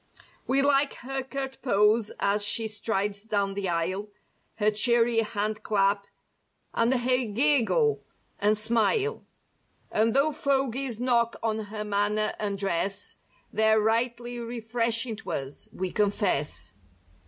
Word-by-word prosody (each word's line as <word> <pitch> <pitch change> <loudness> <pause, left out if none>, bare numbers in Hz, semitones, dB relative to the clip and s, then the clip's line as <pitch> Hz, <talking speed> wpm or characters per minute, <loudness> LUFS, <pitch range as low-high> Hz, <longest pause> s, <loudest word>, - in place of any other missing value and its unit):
We 270 +1 +3
like 280 0 +3
her 270 +1 -2
curt 265 0 -6
pose 210 -2 +3
as 205 +1 +2
she 220 +2 +2
strides 210 -2 -2
down 200 -3 0
the 195 -2 -2
aisle; 185 +5 -2 0.5
Her 215 -1 +2
cheery 230 +2 +3
hand 215 -1 -2
clap 200 -1 +1 0.7
and 230 +2 +2
her 255 0 +1
giggle 290 - +2 0.4
and 210 +1 +3
smile; 235 - +1 0.7
And 225 +2 +2
'though 285 +3 +3
fogies 270 -4 -1
knock 235 -2 +2
on 220 -1 -1
her 210 +1 -5
manner 210 +1 0
and 205 -2 -2
dress 195 0 -1 0.4
They're 220 0 +4
rightly 240 +2 0
refreshing 230 0 -2
to - - -6
us, 135 +1 -5
we 185 -1 -4
confess. 150 - 0
220 Hz, 125 wpm, -27 LUFS, 205-245 Hz, 0.7 s, They're